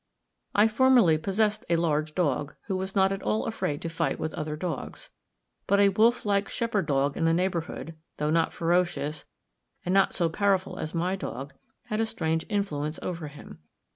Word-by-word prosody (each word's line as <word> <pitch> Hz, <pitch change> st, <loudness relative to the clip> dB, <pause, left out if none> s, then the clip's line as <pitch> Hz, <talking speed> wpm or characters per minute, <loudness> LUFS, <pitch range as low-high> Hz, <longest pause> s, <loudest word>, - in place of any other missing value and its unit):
I 210 Hz, +2 st, +6 dB
formerly 225 Hz, -8 st, +5 dB
possessed 210 Hz, +5 st, 0 dB
a 170 Hz, -, +4 dB
large 155 Hz, -2 st, 0 dB
dog 150 Hz, -4 st, 0 dB
who 195 Hz, -, -2 dB
was 190 Hz, +1 st, -4 dB
not 190 Hz, 0 st, +4 dB
at 195 Hz, 0 st, -3 dB
all 215 Hz, -, 0 dB
afraid 185 Hz, -9 st, -2 dB
to -, -, -2 dB
fight 165 Hz, 0 st, -1 dB
with 160 Hz, -, -3 dB
other 155 Hz, -2 st, -3 dB
dogs; 160 Hz, -3 st, -5 dB, 0.6 s
but 200 Hz, +1 st, +3 dB
a 200 Hz, 0 st, +6 dB
wolf 225 Hz, +5 st, +3 dB
like 200 Hz, -1 st, +1 dB
shepherd 215 Hz, -7 st, -1 dB
dog 140 Hz, 0 st, +1 dB
in 165 Hz, -, 0 dB
the 165 Hz, -, +4 dB
neighbourhood, 170 Hz, -2 st, -2 dB, 0.2 s
though 150 Hz, +1 st, 0 dB
not 165 Hz, 0 st, +2 dB
ferocious 170 Hz, -3 st, 0 dB, 0.6 s
and 180 Hz, -, 0 dB
not 195 Hz, 0 st, +3 dB
so 170 Hz, -, +2 dB
powerful 190 Hz, +1 st, 0 dB
as 155 Hz, -, -4 dB
my 180 Hz, +3 st, 0 dB
dog, 140 Hz, -7 st, -6 dB, 0.3 s
had 215 Hz, -, -2 dB
a 225 Hz, -, +1 dB
strange 160 Hz, -5 st, -1 dB
influence 155 Hz, -7 st, -1 dB
over 165 Hz, -4 st, -4 dB
him. 145 Hz, -, -12 dB
175 Hz, 180 wpm, -27 LUFS, 155-200 Hz, 0.6 s, I